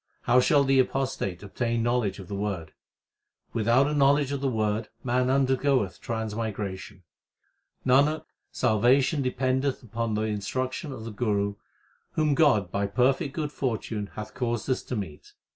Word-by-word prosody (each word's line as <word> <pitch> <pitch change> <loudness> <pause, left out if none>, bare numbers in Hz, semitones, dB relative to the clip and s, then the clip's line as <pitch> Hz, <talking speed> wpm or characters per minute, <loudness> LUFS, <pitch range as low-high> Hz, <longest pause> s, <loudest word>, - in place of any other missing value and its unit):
How 125 +1 +5
shall 140 +2 +4
the 135 -1 +3
apostate 130 -9 -1
obtain 115 +3 -1
knowledge 120 -5 0
of 95 -3 -9
the 100 - -6
Word? 100 -5 -3 0.8
Without 115 +4 +3
a 150 - -1
knowledge 140 -1 +3
of 140 -1 -2
the 140 - +1
Word 110 -2 -1
man 125 +1 +1
undergoeth 130 -5 +2
transmigration. 110 -3 -4 0.8
Nanak, 140 +4 +4 0.3
salvation 130 +6 +3
dependeth 130 +1 0
upon 115 -1 -2
the 105 - 0
instruction 130 - -3
of 110 -4 -7
the 115 - -5
Guru 100 -2 0 0.6
whom 155 -2 +2
God 130 - +3
by 100 0 0
perfect 130 +5 +1
good 150 -2 -2
fortune 110 -6 -3
hath 110 0 -7
caused 120 -4 -2
us 130 - 0
to 125 - -3
meet. 95 -9 -7
120 Hz, 145 wpm, -27 LUFS, 105-135 Hz, 0.8 s, How